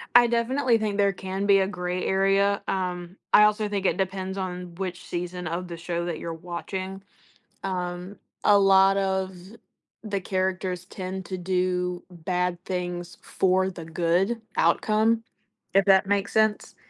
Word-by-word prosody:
I 240 0 +8
definitely 235 +1 +2
think 210 -2 -2
there 200 -1 +3
can 190 +1 -4
be 200 -1 +6
a 190 - +2
gray 180 -1 -3
area. 195 +1 +2
Um, 180 -1 -3 0.2
I 210 - +9
also 210 0 +3
think 200 -2 -2
it 180 - +2
depends 190 0 -2
on 180 -2 -5
which 180 -1 -5
season 180 0 -4
of 175 +2 -3
the 170 - -7
show 170 0 -3
that 170 -3 -3
you're 165 - -4
watching. 185 +3 -5 0.6
Um, 180 0 -4 0.3
a 205 - +7
lot 195 0 +5
of 190 -1 -1 0.7
the 200 -2 -2
characters 185 -1 -2
tend 185 -1 -6
to 185 +1 -4
do 180 0 -1
bad 180 0 -2
things 175 -2 -4
for 190 0 +1
the 170 -3 -8
good 175 +7 0
outcome, 220 +1 +2 0.5
if 195 - +5
that 195 0 +5
makes 200 0 0
sense. 215 -1 +1
190 Hz, 155 wpm, -26 LUFS, 180-200 Hz, 0.7 s, I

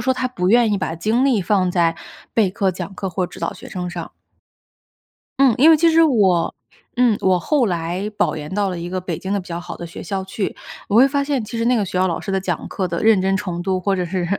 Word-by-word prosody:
说 260 - +2
他 255 0 -1
不 185 -8 -2
愿 230 0 +4
意 200 - +1
把 165 - -3
精 220 +10 +1
力 240 -8 +2
放 185 -1 +1
在 170 -2 +1 0.4
备 215 -4 +3
课、 195 0 0
讲 185 +1 -7
课 190 -1 -4
或 180 +2 -1
者 - - -17
指 190 - -11
导 170 - -2
学 - - -12
生 180 -1 -5
上。 175 -2 -6 1.3
嗯， 270 -3 +6
因 295 +6 +7
为 320 - +7
其 330 +2 +4
实 325 +1 +5
我 200 - +3 0.4
嗯， 240 -4 +3
我 185 -1 +3
后 280 - +1
来 175 +2 -2
保 - - +1
研 150 +1 -7
到 205 -1 +1
了 180 - -4
一 170 +1 -5
个 185 +1 -3
北 175 -3 -4
京 190 - -4
的 200 - 0
比 180 - -14
较 170 - -4
好 - - -8
的 - - -7
学 170 - -9
校 190 +2 -3
去， 190 +1 -4 0.3
我 200 - -2
会 250 +5 +7
发 280 0 0
现 275 -5 -1
其 225 +2 -6
实 230 - 0
那 245 +1 +3
个 215 - +1
学 180 -1 -3
校 185 - +3
老 170 - -2
师 200 - -5
的 195 - +1
讲 180 -4 -3
课 190 - -2
的 170 -1 -3
认 220 -3 +5
真 195 +1 +1
程 180 -3 -4
度， 185 0 -1
或 195 +1 0
者 180 - -1
是 175 0 -2
190 Hz, 290 characters per minute, -20 LUFS, 180-230 Hz, 1.3 s, 因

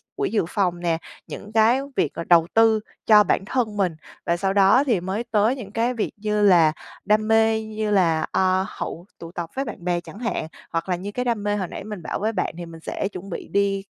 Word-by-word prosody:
quỹ 410 0 -1
dự 215 - +1
phòng 180 -3 0
nè, 170 -2 0 0.3
những 210 - -8
cái 225 +3 +4 0.2
việc 155 - 0
là - - -2
đầu 165 -1 +4
tư 225 -1 +5 0.3
cho 210 -1 +7
bản 195 - 0
thân 215 -2 -1
mình. 185 -5 +1 0.3
Và 170 - +1
sau 195 +2 0
đó 200 +6 +5
thì 240 -9 +1
mới 190 +5 -3
tới 225 +1 +2
những 215 -7 -9
cái 235 +3 0
việc 230 - -2
như 210 0 -1
là 175 -6 +6 0.3
đam 215 0 +2
mê, 225 0 +3
như 215 -1 -3
là, 165 -5 +3
à, 185 0 +2
hậu 175 -4 -6
tụ 165 0 -9
tập 170 -2 -5
với 270 +1 -1
bạn 180 - -8
bè 175 -1 +1
chẳng 200 - -12
hạn, 235 -9 -2 0.2
hoặc 165 +2 -2
là 180 - +2
như 190 +4 -6
cái 250 +4 -3
đam 230 -4 -1
mê 205 0 0
hồi 190 -3 -2
nãy - - -7
mình 210 -2 -7
bảo - - -3
với 215 +2 0
bạn 185 - -1
thì 175 - -6
mình 165 -1 -11
sẽ 195 - -3
chuẩn 190 +1 -8
bị 175 - -6
đi 200 -1 0
205 Hz, 240 wpm, -23 LUFS, 180-220 Hz, 0.3 s, cho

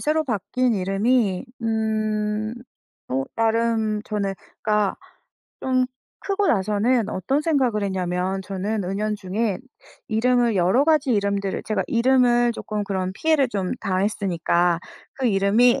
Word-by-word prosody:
새로 310 +1 +1
바뀐 240 +1 0
이름이 195 +1 +1 0.2
음 215 -1 -1 0.6
어 135 +1 0
나름 225 -1 +1
저는 200 -2 -2 0.3
그니까 210 -2 +1 0.7
좀 255 -1 +1 0.3
크고 400 0 0
나서는 215 +3 +2
어떤 270 +11 0
생각을 260 -9 +1
했냐면 185 0 -1
저는 195 +2 -3
은연중에 205 +1 -2 0.5
이름을 235 +1 +2
여러 190 +9 +3
가지 310 -4 +3
이름들을 200 -2 -1
제가 215 - 0
이름을 240 0 +3
쪼끔 210 -2 -4
그런 190 -2 -2
피해를 300 +2 +2
좀 195 -5 -2
당했으니까 180 -3 +1 0.4
그 265 -2 -1
이름이 220 +5 +4
215 Hz, 260 characters per minute, -23 LUFS, 195-240 Hz, 0.7 s, 이름이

